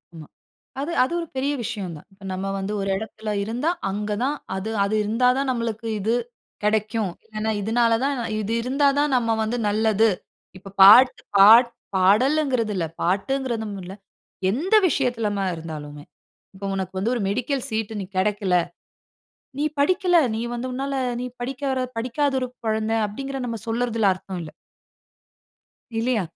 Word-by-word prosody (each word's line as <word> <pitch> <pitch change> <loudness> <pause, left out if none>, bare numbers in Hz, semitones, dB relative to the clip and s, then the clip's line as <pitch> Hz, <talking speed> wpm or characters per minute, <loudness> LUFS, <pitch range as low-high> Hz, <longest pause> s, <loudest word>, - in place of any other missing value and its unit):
ஆமா. 155 -2 -10 0.5
அது 300 +5 -3
அது 265 - -4
ஒரு 335 - -5
பெரிய 275 +2 0
விஷயம் 205 -7 -4
தான். 150 - -14
இப்ப 195 0 -17
நம்ம 190 +1 -3
வந்து 195 +2 -3
ஒரு 195 0 -1
இடத்தில 215 +1 -6
இருந்தா 240 +9 -1 0.2
அங்க 210 +2 -3
தான் 290 +2 0 0.2
அது 195 +3 -4
அது 200 - -1
இருந்தா 225 +4 +2
தான் 275 -1 -1
நம்மளுக்கு 230 -2 -3
இது 220 +4 +1 0.5
கிடைக்கும். 215 -1 0
இல்லைனா 215 0 -3
இதனால 230 +2 +2
தான் 280 +1 +1 0.3
இது 215 +1 -3
இருந்தா 275 +3 +2
தான் 290 -1 +2
நம்ம 230 -2 +1
வந்து 220 +2 -1
நல்லது. 220 +1 +3 0.5
இப்ப 195 +1 -12
பாட்டு 235 +7 +8 0.2
பாட் 225 +5 +8 0.3
பாடல்ங்கறது 235 +4 +3
இல்ல 170 -3 0 0.2
பாட்டுங்கறதும் 220 +3 -1
இல்ல. 180 +1 -8 0.6
எந்த 340 - 0
விஷயத்திலமா 230 - 0
இருந்தாலுமே 150 -2 -8 0.5
இப்போ 195 +1 -7
உனக்கு 190 -1 -4
வந்து 215 +6 0
ஒரு 235 - -2
மெடிக்கல் 250 +5 -1
சீட் 220 0 -2
நீ 195 - -4
கிடைக்கல. 195 -1 +1 1.0
நீ 295 - +1
படிக்கல, 360 +4 +3 0.2
நீ 220 - -2
வந்து 240 +1 -4
உன்னால 275 +2 -3 0.3
நீ 250 - -3
படிக்காத 265 +1 -2 0.2
படிக்காத 255 +5 0
ஒரு 255 - -2 0.2
குழந்தை 220 +1 0
அப்படிங்கறத 270 +5 -5
நம்ம 230 -1 -4
சொல்லறதில 225 -3 +1
அர்த்தம் 185 0 -7
இல்ல. 155 -2 -9 1.5
இல்லையா? 235 -2 +1
225 Hz, 150 wpm, -23 LUFS, 200-255 Hz, 1.5 s, பாட்டு